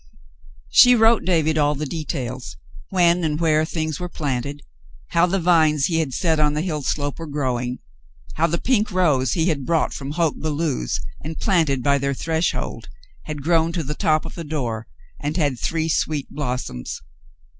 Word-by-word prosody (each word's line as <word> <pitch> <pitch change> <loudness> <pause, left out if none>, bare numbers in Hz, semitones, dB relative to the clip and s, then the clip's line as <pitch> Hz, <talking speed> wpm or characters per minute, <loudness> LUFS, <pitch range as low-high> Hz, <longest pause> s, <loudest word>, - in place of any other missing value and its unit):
She 250 0 +8
wrote 225 0 +4
David 160 -3 +2
all 145 0 +2
the 150 +2 -3
details: 130 - -5 0.3
when 175 -1 +3
and 150 -1 0
where 155 -2 +3
things 155 -2 -3
were 180 0 -4
planted 140 -2 -3 0.2
— 65 -3 -25
how 170 +1 +4
the 190 +2 0
vines 160 -4 +3
he 165 -2 +1
had 155 -4 -1
set 160 +3 +1
on 150 -1 +2
the 150 - 0
hill 155 -5 -2
slope 145 +2 -2
were 165 - -6
growing 125 -4 -2 0.3
— - - -20
how 165 +2 +3
the 170 - 0
pink 225 -4 +1
rose 150 -10 +2
he 165 +1 +1
had 145 -4 -1
brought 165 +3 +1
from 140 +1 -5
Hoke 165 -2 0
Belew's 150 - -1 0.2
and 155 +2 -5
planted 160 - +1
by 140 0 +3
their 140 0 -1
threshold 160 +4 -2 0.4
had 150 -2 -6
grown 165 +1 +2
to 170 -2 -1
the 150 +1 -3
top 155 +1 +1
of - - -7
the 170 - -6
door, 125 -8 -3 0.3
and 150 +3 -3
had 145 -7 0
three 160 -1 -1
sweet 155 -3 0
blossoms. 125 - -4
155 Hz, 185 wpm, -22 LUFS, 140-165 Hz, 0.4 s, She